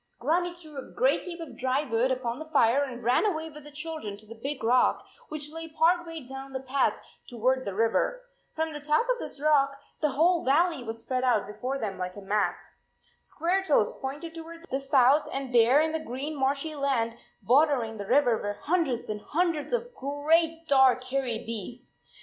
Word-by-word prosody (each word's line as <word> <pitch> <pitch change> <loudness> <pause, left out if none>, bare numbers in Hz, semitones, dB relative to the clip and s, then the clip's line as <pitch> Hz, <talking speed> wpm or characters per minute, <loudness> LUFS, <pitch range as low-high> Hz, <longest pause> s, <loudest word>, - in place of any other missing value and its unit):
Grannie 350 +6 0
threw 310 -5 -10
a - - -10
great - - +1
heap 350 -1 -7
of 330 -3 -8
dry 260 +3 0
wood 245 -2 +1
upon 250 -1 -2
the 315 0 -8
fire 275 -3 +4
and 250 -3 -6
ran 285 - +2
with 315 -2 -7
the 295 - -11
children 300 -8 -6
to 215 - -15
the 220 - -10
big 265 +4 -5
rock, 245 +3 +3 0.2
which 300 -1 -6
lay 325 +1 -6
part 335 +2 +2
way 325 -4 -7
down 270 +1 -8
the 265 - -2
path 265 +1 +1 0.3
toward 255 +2 0
the 200 - -4
river. 230 - +1 0.3
From 320 0 -1
the 295 - -5
top 300 +10 +1
of - - +1
this - - -6
25 290 - -7
rock 275 -1 +2 0.2
the 305 - +3
whole 335 +4 +3
valley 300 +1 +2
was 225 -1 -5
spread 255 +2 -2
out 240 -5 +2
be 210 - -9
fore 260 +5 -3
them 200 -7 -4
like 180 0 -4
a 205 - -8
map. 205 +1 0 0.7
Squaretoes 340 - +1
pointed 295 +5 -5
toward 330 +1 -10
the 270 - 0
south, 275 +1 +4
and 270 -2 -4
there 240 +4 +6
in 315 +1 +2
the 320 - -1
green 295 +1 -5
marshy 280 +3 0
land 270 -6 0 0.3
bordering 250 -2 +3
the 200 -1 -6
river 250 -3 +4
were 205 0 -2
hundreds 310 -8 0
and 210 -1 -4
hundreds 330 - -1
of 485 0 -2
great 325 - +1
dark 265 -3 +5
hairy 255 -3 -1
beasts. 230 +2 -8
275 Hz, 195 wpm, -28 LUFS, 245-320 Hz, 0.7 s, there